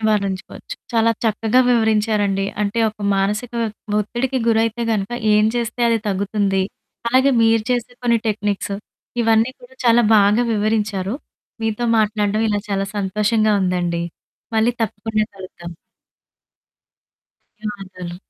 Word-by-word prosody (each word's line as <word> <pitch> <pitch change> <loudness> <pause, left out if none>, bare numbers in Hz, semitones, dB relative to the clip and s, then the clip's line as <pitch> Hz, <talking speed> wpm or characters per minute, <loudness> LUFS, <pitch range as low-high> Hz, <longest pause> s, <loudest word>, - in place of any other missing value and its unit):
నివారించుకోవచ్చు. 205 - -2 0.2
చాలా 230 0 +3
చక్కగా 225 +2 +2
వివరించారండి. 215 -4 +2 0.2
అంటే, 205 +3 -1
ఒక 215 - -24 0.2
మానసిక 210 +5 -1 0.5
ఒత్తిడికి 240 +5 -2
గురైతే 225 +1 +1
గనుక 200 -1 -1 0.2
ఏం 210 - +4
చేస్తే 240 0 -2
అది 230 -1 +2
తగ్గుతుంది? 200 0 0 0.5
అలాగే 260 +3 +4
మీరు 225 0 +4
చేసే 245 0 -1
కొన్ని 235 -1 +3
టెక్నిక్స్. 205 -2 -1 0.5
ఇవన్నీ 225 +1 +3
కూడా 245 +1 -16
చాలా 235 0 +5
బాగా 210 +3 +4
వివరించారు. 210 -2 0 0.5
మీతో 225 +2 -1
మాట్లాడ్డం 210 0 +1
ఇలా 205 -1 0
చాలా 195 -1 -1
సంతోషంగా 210 +2 +1
ఉందండి. 175 -2 0 0.5
మళ్ళీ 225 +2 +4
తప్పకుండ 220 0 -2 0.2
కలుద్దాం. 180 -2 -9 1.9
ధన్యవాదాలు. 190 -4 -7
215 Hz, 110 wpm, -20 LUFS, 200-230 Hz, 1.9 s, చాలా